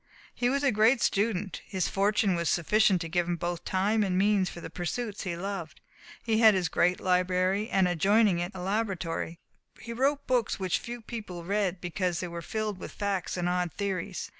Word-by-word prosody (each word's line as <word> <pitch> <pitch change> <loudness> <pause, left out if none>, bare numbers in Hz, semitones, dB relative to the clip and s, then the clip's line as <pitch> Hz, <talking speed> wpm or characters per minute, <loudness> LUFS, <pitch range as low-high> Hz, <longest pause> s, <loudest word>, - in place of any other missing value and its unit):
He 245 0 0
was 280 +2 0
a 275 - +4
great 220 +4 +4
student. 200 -2 0
His 190 -3 -2
fortune 200 0 +2
was 170 -1 0
sufficient 190 +1 +3
to 165 - -3
give 175 +1 0
him 175 - 0
both 175 0 -3
time 205 +4 +1
and 190 -3 +1
means 195 -1 +3
for - - -9
the - - -8
pursuits 205 +5 -4
he 170 -2 -3
loved. 185 -4 -5 0.4
He 220 -1 +1
had 220 -3 +7
his 180 -3 0
great 180 +1 +2
library, 185 +3 +1
and 190 -4 +3
adjoining 195 +2 +3
it 175 +2 -3
a 185 - -6
laboratory. 185 -4 -2 0.4
He 235 - -7
wrote 280 +4 +1
books 245 -6 0
which 185 -2 0
few 240 0 -7
people 210 -7 -7
read 195 -1 0
because 175 0 -2
they 180 - -3
were 170 0 -6
filled 210 +2 -3
with - - -7
facts 200 -3 -2
and 175 0 -1
odd 180 -1 0
theories. 195 -2 -3
190 Hz, 195 wpm, -28 LUFS, 175-215 Hz, 0.4 s, had